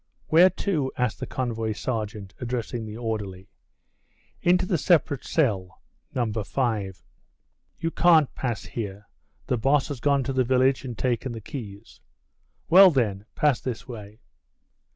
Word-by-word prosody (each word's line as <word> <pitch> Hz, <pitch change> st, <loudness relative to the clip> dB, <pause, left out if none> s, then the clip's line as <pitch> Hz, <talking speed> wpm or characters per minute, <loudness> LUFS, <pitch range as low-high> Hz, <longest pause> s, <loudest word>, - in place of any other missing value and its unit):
"Where 175 Hz, +4 st, +7 dB, 0.2 s
to?" 150 Hz, -10 st, 0 dB
asked 125 Hz, -3 st, -1 dB
the -, -, -5 dB
convoy 115 Hz, -4 st, -2 dB
sergeant, 105 Hz, -4 st, -4 dB
addressing 120 Hz, -2 st, -3 dB
the 105 Hz, +1 st, -7 dB
orderly. 105 Hz, -5 st, -4 dB, 0.9 s
"Into 180 Hz, +1 st, +3 dB
the 180 Hz, -3 st, 0 dB
separate 155 Hz, -5 st, +2 dB
cell, 95 Hz, -, 0 dB, 0.4 s
No. 125 Hz, -, +1 dB
5." 110 Hz, -3 st, -2 dB, 0.8 s
"You 165 Hz, -, -1 dB
can't 165 Hz, -6 st, +4 dB
pass 120 Hz, -6 st, -3 dB
here; 105 Hz, -2 st, -6 dB, 0.4 s
the 125 Hz, -, 0 dB
boss 135 Hz, +5 st, +2 dB
has 140 Hz, -4 st, -5 dB
gone 140 Hz, +1 st, +2 dB
to 135 Hz, +2 st, -3 dB
the 130 Hz, -1 st, +2 dB
village 130 Hz, +2 st, +2 dB
and 125 Hz, -3 st, -6 dB
taken 125 Hz, 0 st, -1 dB
the 115 Hz, -, -6 dB
keys." 105 Hz, -3 st, -9 dB, 0.7 s
"Well, 190 Hz, +3 st, +9 dB
then, 105 Hz, -, 0 dB
pass 145 Hz, -5 st, +2 dB
this 125 Hz, -1 st, -5 dB
way." 110 Hz, -2 st, -10 dB
120 Hz, 140 wpm, -25 LUFS, 110-140 Hz, 0.9 s, Well